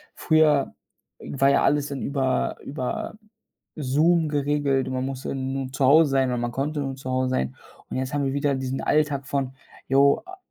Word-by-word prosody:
früher 155 -3 +3 0.5
war 135 0 +1
ja - - +3
alles 145 0 +2
dann 140 -2 -5
über 135 -2 -1
über 135 +7 -4 0.6
Zoom 155 +3 +2
geregelt. 145 -2 0
Man 130 0 -2
muss 135 -1 -5
ja - - -2
nur 135 0 -3
zu 135 0 0
Hause 150 +1 +6
sein 135 -1 +2
oder 125 - -1
man 120 0 -2
konnte 145 +4 -2
nur 135 -1 -3
zu 130 -1 -8
Hause 130 0 0
sein 65 - -1 0.3
und - - -4
jetzt 130 +1 -3
haben 145 -1 0
wir 135 - -1
wieder 140 0 +1
diesen 130 0 -3
Alltag 145 -2 +1
von, 135 -2 -2 0.3
jo, 140 +1 +4
a 375 +1 -11
135 Hz, 190 wpm, -24 LUFS, 130-145 Hz, 0.6 s, Hause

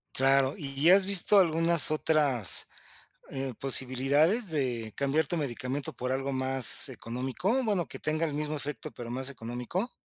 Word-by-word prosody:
Claro, 135 +1 -1
¿y 140 - -9
y 165 +4 +2
has 190 0 +3
visto 200 +1 +7
algunas 165 -3 +4
otras, 150 - +1 0.6
eh, 135 -2 -7
posibilidades 140 - +1
de 120 -8 -5
cambiar 140 +3 -3
tu 175 - -5
medicamento 140 +2 -7
por 125 +1 -7
algo 135 +1 -5
más 130 0 +4
económico, 130 - -6
bueno, 200 -6 -4
que - - -10
tenga 155 +1 -3
el 145 - -8
mismo 150 +1 -6
efecto, 150 0 -8
pero 120 -1 -12
más 130 +2 -1
económico? 125 - -8
140 Hz, 155 wpm, -25 LUFS, 130-160 Hz, 0.6 s, visto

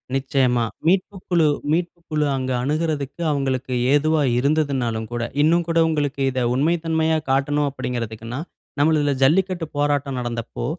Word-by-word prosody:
நிச்சயமா. 130 -3 +1 0.2
மீட்புக்குழு 185 -3 +1 0.2
மீட்புக்குழு 165 -2 -1
அங்க 130 0 -2
அணுகுறத்துக்கு 150 +1 -2
அவங்களுக்கு 130 -2 -1 0.2
ஏதுவா 155 +1 +3 0.2
இருந்ததுனாலும் 130 -6 0
கூட, 120 0 -2 0.2
இன்னும் 165 +3 +3
கூட 165 0 0
உங்களுக்கு 145 -3 -1
இதை 130 - -2
உண்மைத்தன்மையா 160 +2 +1
காட்டணும் 145 +2 +1
அப்படிங்கிறதுக்குன்னா, 115 -1 -5 0.4
நம்மள 155 +2 +4
இதில 145 -1 +1
ஜல்லிக்கட்டு 175 +3 +2
போராட்டம் 145 -2 0
நடந்தபோ, 120 -1 -4
145 Hz, 115 wpm, -22 LUFS, 130-160 Hz, 0.4 s, நம்மள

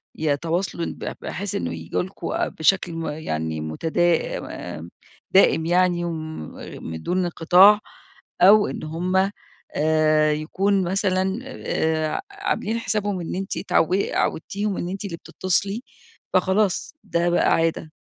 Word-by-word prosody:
يتواصلوا 165 +4 -1
ب - - -5
بحيث 200 0 -4
إنه 85 -1 -2
ييجوا 80 - -2
لكم 185 -2 -3
بشكل 180 +2 +2
م 165 -1 -4
يعني 80 - -3
متدا 160 - 0 0.4
آمم 85 +2 -9 0.4
دائم 175 -4 +5
يعني 175 0 +2
وم 160 -2 -5 0.4
من 80 0 -6
دون 180 +1 -1
انقطاع، 180 +5 +6 0.6
أو 205 +3 +7
إن - - -5
هم 185 +5 0 0.4
آآ 155 0 +3
يكون 190 +6 0
مثلًا 190 +2 0
آآ 160 -11 -1
ع - - -2
عاملين 230 - -2
حسابهم 205 -3 -1
إن 170 - -4
أنتِ 195 +1 -3
اتعود 180 +4 +2
عودتيهم 200 +4 -1
إن 175 - -3
أنتِ 195 +2 -5
اللي 170 -4 -4
بتتصلي 195 +7 -1 0.5
فخلاص 195 +4 +1
ده 170 +1 0
بقى 175 - +3
عادة. 165 -1 0
175 Hz, 130 wpm, -23 LUFS, 155-195 Hz, 0.6 s, أو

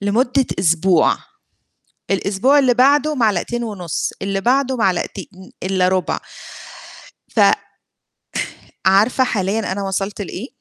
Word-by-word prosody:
لمدة 245 +6 +1
أسبوع، 175 -1 +3 1.0
الأسبوع 200 +9 +2
اللي 255 -3 +3
بعدُه 285 +4 +3
معلقتين 235 0 0
ونُصّ، 190 -8 -3
اللي 195 0 -2
بعده 260 +3 +1
معلقتين 190 -2 -1 0.4
إلّا 185 -1 +1
رُبع. 185 -1 0 1.1
ف - - -23 1.5
عارفة 210 +7 +4
حاليًا 210 -3 -1
أنا 200 +1 -3
وصلت 195 +1 -3
لإيه؟ 200 +4 -6
200 Hz, 100 wpm, -19 LUFS, 190-250 Hz, 1.5 s, عارفة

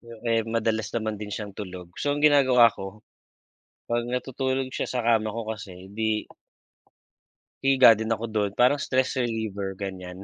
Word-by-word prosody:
Yun 115 -1 -13
eh, 115 -1 +2
madalas 110 -2 0
naman 110 -2 -3
din 105 - -5
siyang 105 0 -5
tulog. 90 -3 -8
So, 145 0 0
ang 145 - -1
ginagawa 130 -6 +6
ko, 95 0 -9 0.9
'pag 120 0 0
natutulog 130 +1 -2
siya - - -3
sa 125 - -2
kama 110 -2 +2
ko 115 -1 -5
kasi, 95 -4 -8
di 110 +1 -2 1.3
hihiga 130 -4 +7
din 110 +1 -3
ako 115 +1 -1
dun, 105 -2 -1
parang 125 +4 +4
stress 130 +1 0
reliever, 110 -5 -3
ganyan. 95 -1 -6
110 Hz, 160 wpm, -26 LUFS, 105-125 Hz, 1.3 s, hihiga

